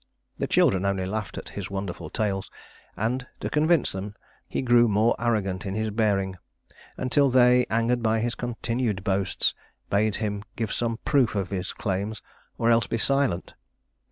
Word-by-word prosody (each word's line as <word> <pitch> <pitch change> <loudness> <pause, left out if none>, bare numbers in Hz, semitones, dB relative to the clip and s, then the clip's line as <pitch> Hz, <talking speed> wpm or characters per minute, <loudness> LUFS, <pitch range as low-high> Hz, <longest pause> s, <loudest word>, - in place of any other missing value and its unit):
The - - 0
children 95 -1 +3
only 100 -1 0
laughed 105 +1 -4
at - - -7
his 100 -2 -6
wonderful 95 -4 -5
tales, 100 +1 -2 0.5
and 125 +4 -1
to - - -4
convince 155 0 +3
them 100 +2 -6 0.3
he - - -2
grew 120 -1 +5
more 110 +2 +3
arrogant 105 -5 0
in 95 -1 -4
his 110 0 -1
bearing, 100 -3 +1 0.6
until 135 +2 +3
they, 125 0 +5
angered 115 +2 +1
by 110 0 +2
his 120 +1 -1
continued 115 -4 -2
boasts, 100 -1 +1 0.4
bade 105 +1 +2
him 105 -2 -2
give 115 -2 -2
some 115 -1 -1
proof 135 -7 +3
of 100 -2 -2
his 95 -2 -2
claims 100 +2 -3 0.3
or 115 0 +3
else 115 -2 +3
be - - -1
silent. 135 -7 +1
110 Hz, 160 wpm, -26 LUFS, 100-120 Hz, 0.6 s, grew